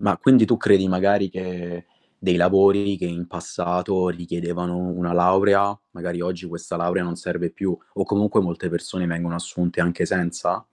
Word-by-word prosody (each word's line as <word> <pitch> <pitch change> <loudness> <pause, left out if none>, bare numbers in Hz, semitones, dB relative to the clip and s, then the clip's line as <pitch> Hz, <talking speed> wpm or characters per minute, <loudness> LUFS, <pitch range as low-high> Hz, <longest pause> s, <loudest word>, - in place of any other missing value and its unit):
Ma 100 -3 +2
quindi, 130 -4 +7
tu 115 +1 +2
credi 95 -3 +4
magari 100 +1 +2
che 90 -2 -7 0.3
dei 90 -2 +1
lavori 100 +2 +4
che - - -5
in 85 0 -5
passato 90 +1 -2
richiedevano 85 0 -4
una 90 -1 -3
laurea, 100 +3 +3
magari 85 0 -5
oggi 90 0 -4
questa 85 0 -6
laurea 90 +2 0
non 85 -1 -4
serve - - -4
più 95 -3 -3 0.2
o - - -1
comunque 105 0 +2
molte 90 0 -3
persone 90 +1 -3
vengono 85 0 -2
assunte 85 0 -2
anche 85 0 +1
senza? 90 -2 -1
90 Hz, 160 wpm, -22 LUFS, 85-95 Hz, 0.3 s, quindi